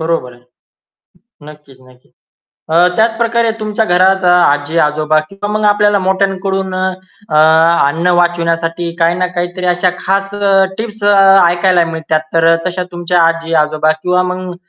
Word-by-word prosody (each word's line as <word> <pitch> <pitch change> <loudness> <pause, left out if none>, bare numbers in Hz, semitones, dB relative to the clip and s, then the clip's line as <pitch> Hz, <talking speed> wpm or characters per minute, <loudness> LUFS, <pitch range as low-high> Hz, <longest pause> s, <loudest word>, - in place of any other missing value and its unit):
बरोबर 160 -6 -3
आहे. 120 0 -20 1.0
नक्कीच, 150 -3 -15
नक्कीच. 125 0 -24 0.6
अ, 170 +3 +3
त्याच 225 +1 +1
प्रकारे 235 -1 0
तुमच्या 215 +1 -2
घरात 190 +1 +2
आजी-आजोबा 155 -1 +1
किंवा 195 +1 -7
मग 215 0 -2
आपल्याला 205 0 +2
मोठ्यांकडून 190 0 -2
अ, 185 - -3 0.5
अ, 155 - -2 0.5
अन्न 165 +5 -2
वाचवण्यासाठी 170 0 -1
काही 165 +1 +2
ना 180 0 -1
काहीतरी 175 +1 -4
अशा 180 +1 +1
खास 195 +1 -2
अ, 200 -1 +2
टिप्स 220 -2 -7
अ, 205 0 +3 0.3
ऐकायला 175 0 +1
मिळतात. 160 -1 -2
तर 165 0 +2
अ, - - +3
तशा 180 0 -3
तुमच्या 175 0 -1
आजी-आजोबा 155 -2 0
किंवा 180 0 +1
मग 180 -1 -6
175 Hz, 145 wpm, -13 LUFS, 165-195 Hz, 1.0 s, अ